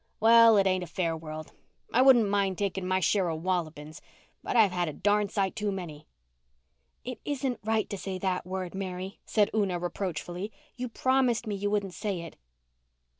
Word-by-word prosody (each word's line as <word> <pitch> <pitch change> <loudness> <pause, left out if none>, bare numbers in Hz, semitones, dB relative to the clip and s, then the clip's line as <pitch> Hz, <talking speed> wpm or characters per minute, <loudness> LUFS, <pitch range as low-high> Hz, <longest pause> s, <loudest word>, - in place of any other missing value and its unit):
Well, 230 0 +7
it 195 - +4
ain't 185 -1 +1
a - - -7
fair 165 0 -1
world. 155 -1 -8 0.4
I 250 - +5
wouldn't 255 -5 +6
mind 200 -2 +1
taking 190 -2 -2
my 185 0 +2
share 185 +1 +2
of 160 0 -4
wallopings 160 -4 -3 0.4
but - - -3
I've 215 -5 +5
had 175 -1 -1
a - - -6
darn 205 +3 +1
sight 195 -2 -1
too 210 -2 -1
many." 160 -6 -7 1.0
"It 250 0 -6
isn't 270 -4 -2
right 220 0 0
to 200 - -5
say 190 -1 -4
that 185 -1 -1
word, 185 -1 -4
Mary," 190 0 -5
said 210 -2 +2
Una 200 -5 +1
reproachfully. 180 +2 -4 0.2
"You 250 0 -4
promised 255 -1 +1
me 215 - -3
you 205 +1 -1
wouldn't 200 -3 -1
say 200 -4 -3
it." 165 - -9
195 Hz, 180 wpm, -28 LUFS, 180-215 Hz, 1.0 s, Well